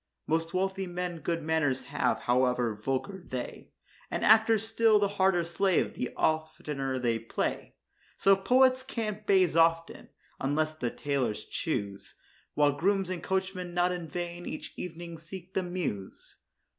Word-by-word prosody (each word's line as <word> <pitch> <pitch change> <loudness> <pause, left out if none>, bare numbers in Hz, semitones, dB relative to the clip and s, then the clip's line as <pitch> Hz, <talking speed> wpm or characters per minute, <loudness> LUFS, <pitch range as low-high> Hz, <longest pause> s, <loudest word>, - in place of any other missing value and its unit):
Most 165 +1 0
wealthy 190 0 -1
men 175 -1 -4
good 165 0 -2
manors 155 -5 +1
have, - - 0
however 125 -2 +2
vulgar 135 - -3
they; 130 -7 -6 0.4
And - - -1
actors 220 0 +5
still 225 -1 +4
the 205 -1 +3
harder 190 -3 +2
slave 180 +2 +1
the 125 - -3
oftener 150 -4 -1
they 120 -2 0
play. 115 - -3 0.4
So 195 0 +5
poets 255 +6 +4
can't 225 -5 -3
the - - +3
baize 185 -4 +4
obtain, 165 0 +2 0.3
unless 155 +3 0
their 125 -6 -2
tailors 125 -7 -2
choose; 100 - -3 0.4
While 145 -1 +4
grooms 195 0 +1
and 180 -3 -3
coachmen 190 -1 -2
not 175 +1 +3
in 175 -2 -4
vain 175 +2 -5
each 155 - -6
evening 170 -1 -7
seek 180 +3 -10
the 190 - +1
Mews. 175 - -5
170 Hz, 145 wpm, -29 LUFS, 145-190 Hz, 0.4 s, actors